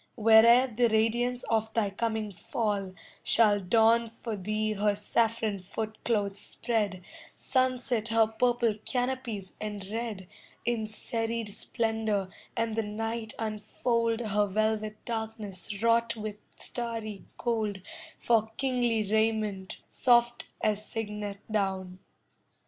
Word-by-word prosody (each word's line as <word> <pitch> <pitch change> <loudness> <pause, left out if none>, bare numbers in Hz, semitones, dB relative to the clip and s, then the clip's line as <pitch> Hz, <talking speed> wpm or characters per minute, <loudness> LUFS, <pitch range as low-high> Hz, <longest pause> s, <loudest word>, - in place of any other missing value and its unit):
Where'er 225 +2 +7
the 240 -1 +2
radiance 235 +3 +1
of 220 -1 0
thy 210 -3 +1
coming 220 0 -2
fall, 200 -1 -2 0.3
Shall 210 -3 +4
dawn 225 +4 +4
for 230 0 -5
thee 215 +2 -1
her 205 0 +1
saffron 220 0 +1
footcloths 210 +1 -2
spread, 210 -6 -2 0.3
Sunset 255 -3 0
her 225 -1 +4
purple 235 0 +1
canopies 245 -6 -2
and 205 -2 -5
red, 220 -5 -4 0.4
In 230 -2 0
serried 225 0 -2
splendour, 220 -2 -1 0.3
and 230 -1 0
the 225 - +2
night 220 +1 -4
unfold 230 +2 -1
Her 210 -2 +1
velvet 215 +1 0
darkness 220 -3 -3
wrought 230 0 +3
with 215 -1 -5 0.2
starry 225 -4 -3
gold 215 -4 -1 0.4
For 225 -2 +2
kingly 245 -4 +1
raiment, 215 -2 0
soft 240 -1 +3
as 210 -1 +1
cygnet 210 -2 -5
down. 190 -3 -1
220 Hz, 110 wpm, -29 LUFS, 210-230 Hz, 0.4 s, Where'er